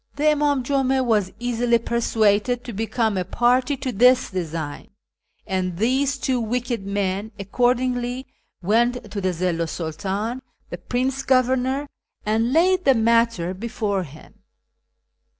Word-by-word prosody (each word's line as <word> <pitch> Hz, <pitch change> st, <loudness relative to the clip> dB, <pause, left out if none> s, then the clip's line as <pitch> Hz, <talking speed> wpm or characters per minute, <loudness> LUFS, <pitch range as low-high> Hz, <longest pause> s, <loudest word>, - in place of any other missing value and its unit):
The 285 Hz, -, -3 dB
Imdm 295 Hz, -3 st, +2 dB
Jum 270 Hz, 0 st, +1 dB
a 265 Hz, -1 st, +2 dB
was 210 Hz, -6 st, +1 dB
easily 240 Hz, 0 st, +1 dB
persuaded 230 Hz, 0 st, +1 dB
to 240 Hz, -, -7 dB
become 220 Hz, 0 st, -1 dB
a -, -, 0 dB
party 250 Hz, +7 st, +1 dB
to 260 Hz, -1 st, -3 dB
this 250 Hz, +3 st, +4 dB
design, 165 Hz, -5 st, -4 dB, 0.6 s
and 185 Hz, -2 st, -2 dB
these 265 Hz, +6 st, +1 dB
two 255 Hz, -1 st, 0 dB
wicked 235 Hz, -2 st, -2 dB
men 200 Hz, +1 st, -2 dB
accordingly 245 Hz, +4 st, 0 dB, 0.4 s
went 230 Hz, +2 st, +1 dB
to 200 Hz, -, -3 dB
the 185 Hz, -, +1 dB
Zillu 170 Hz, -1 st, -1 dB
's -, -, -6 dB
Sidtdn, 195 Hz, +9 st, -3 dB, 0.3 s
the -, -, -5 dB
Prince 260 Hz, +2 st, -1 dB
Governor, 260 Hz, +1 st, +1 dB, 0.4 s
and 225 Hz, +3 st, +1 dB
laid 365 Hz, +5 st, +3 dB
the 270 Hz, -4 st, +5 dB
matter 230 Hz, -5 st, +2 dB
before 205 Hz, -1 st, -2 dB
him. 155 Hz, -3 st, -13 dB
235 Hz, 135 wpm, -22 LUFS, 200-255 Hz, 0.6 s, the